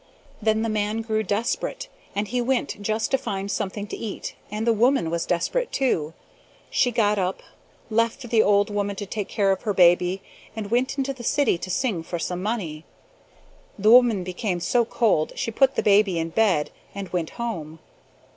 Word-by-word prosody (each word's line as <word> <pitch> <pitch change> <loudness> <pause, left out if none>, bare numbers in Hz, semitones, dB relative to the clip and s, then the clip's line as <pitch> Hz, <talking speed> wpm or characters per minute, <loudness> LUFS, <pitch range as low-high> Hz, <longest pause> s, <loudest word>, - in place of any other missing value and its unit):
Then 220 0 +2
the - - 0
man 215 0 -1
grew 220 -1 0
desperate 220 - -2 0.3
and 205 +1 -1
he 245 +4 -1
went 245 -4 -1
just 215 +2 -1
to 270 - +3
find 195 -2 -3
something 200 +1 -3
to - - -6
eat 215 -4 -5 0.2
and 215 +2 -3
the 230 - +4
woman 230 -6 +2
was 170 0 -2
desperate, 455 - 0
too. 165 - 0 0.6
She 250 - +3
got 210 -3 +2
up, 185 0 -2 0.5
left 230 +3 0
the 225 -2 +5
old 205 0 +3
woman 205 -1 -1
to 205 - -5
take 205 0 -4
care 200 -2 +1
of 190 - -1
her 205 -2 -2
baby, 180 +1 +4 0.3
and 215 -2 -5
went 255 +3 +1
into 275 0 -1
the 255 - -11
city 275 -7 +2
to 185 - -6
sing 200 -2 0
for 175 +2 -5
some 180 +2 -3
money. 185 -8 -3 0.9
The 210 +2 +4
woman 235 -6 +6
became 180 +1 -2
so 235 +7 +2
cold 215 -10 +1
she 230 - -2
put 270 +4 +3
the - - 0
baby 200 -3 +4
in 165 0 -1
bed 175 -5 +2 0.2
and 200 -2 -5
went 170 -3 -2
home. 165 -10 -4
210 Hz, 185 wpm, -24 LUFS, 185-230 Hz, 0.9 s, woman